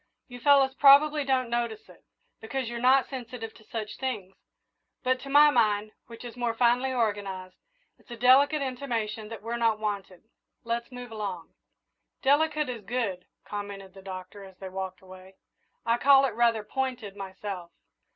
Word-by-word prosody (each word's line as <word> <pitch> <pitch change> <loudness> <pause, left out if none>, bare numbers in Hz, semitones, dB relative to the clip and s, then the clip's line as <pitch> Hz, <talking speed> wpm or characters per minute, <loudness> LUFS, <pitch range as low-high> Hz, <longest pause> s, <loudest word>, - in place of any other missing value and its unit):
"You 245 -1 -10
fellows 275 0 +5
probably 290 +2 +6
don't 260 -2 +1
notice 235 -2 -2
it, - - -18 0.4
because 255 +3 -4
you're 235 0 -4
not 260 +2 +4
sensitive 240 -3 -7
to 215 - -18
such 215 -1 -6
things; 210 -8 -4 0.7
but, 255 0 +1
to 275 - -9
my 295 +1 +7
mind, 215 -4 +2 0.2
which 230 +1 -11
is 240 - -8
more 240 -2 -1
finely 245 +2 +2
organised, 200 -6 -2 0.4
it's - - -26
a 235 - -7
delicate 275 +5 +5
intimation 230 -5 -3
that 225 -2 -8
we're 235 +1 -3
not 230 -2 +2
wanted. 200 -4 -4 0.4
Let's 235 +2 -3
move 250 -1 -9
along." 200 -6 -5 0.7
"'Delicate' 300 +2 +3
is 240 -3 -5
good," 195 -5 -2 0.2
commented 200 -2 -7
the 195 - -13
Doctor, 190 +1 -8
as 190 -1 -14
they 190 0 -7
walked 190 -1 -6
away. 185 0 -14 0.5
"I 235 +1 +2
call 275 0 +6
it 265 - 0
rather 230 -1 +2
pointed, 245 -3 -3
myself." 190 -2 -6
230 Hz, 160 wpm, -28 LUFS, 205-260 Hz, 0.7 s, my